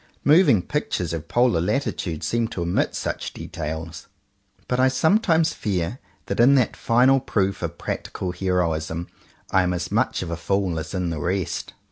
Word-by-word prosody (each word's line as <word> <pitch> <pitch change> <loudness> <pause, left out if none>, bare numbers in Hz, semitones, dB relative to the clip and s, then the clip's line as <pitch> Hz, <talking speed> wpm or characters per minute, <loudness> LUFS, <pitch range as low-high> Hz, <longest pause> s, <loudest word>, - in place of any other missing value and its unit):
Moving 145 - +5
Pictures 90 - -2
of 80 -1 -5
polar 120 -7 +2
latitudes 90 - -2
seem 115 -1 0
to 90 -6 -4
omit 85 +1 0
such - - -3
details; 80 0 -6 0.6
but 125 - 0
I 130 - +5
sometimes 160 - +3
fear 100 +3 -2 0.3
that - - -3
in 130 +4 +6
that 125 -4 +2
final 130 +3 +4
proof 100 -5 -1
of - - -4
practical 90 - -4
heroism 85 -3 -1 0.4
I 95 - +4
am 90 -1 0
as 90 - -4
much - - +1
of 85 - -5
a 85 - -3
fool 95 -2 0
as 80 - -6
in 90 -2 -1
the 80 - -3
rest. 90 +3 -2
95 Hz, 165 wpm, -23 LUFS, 85-125 Hz, 0.6 s, in